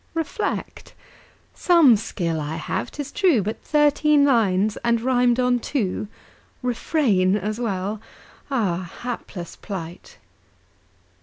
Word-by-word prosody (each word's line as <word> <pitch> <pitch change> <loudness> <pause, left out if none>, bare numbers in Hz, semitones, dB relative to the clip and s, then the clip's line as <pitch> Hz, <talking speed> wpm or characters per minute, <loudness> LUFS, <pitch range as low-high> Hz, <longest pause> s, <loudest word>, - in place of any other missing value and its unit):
Reflect. 325 -1 -4 0.6
Some 330 -9 +5
skill 170 -6 -3
I 150 +2 -4
have, 165 - -3
'tis 285 -2 -7
true; 350 - +3
But 215 +3 -4
thirteen 295 0 +3
lines! 215 -6 +2
and 235 -1 +1
rimed 245 0 +2
on 250 -1 +2
two! 215 -5 -2 0.6
"Refrain" 230 - +1
as 210 +3 -3
well. 205 -2 -2 0.5
Ah, 185 -9 -1
Hapless 210 -7 -6
plight! 175 -4 -8
230 Hz, 105 wpm, -23 LUFS, 190-270 Hz, 0.6 s, Some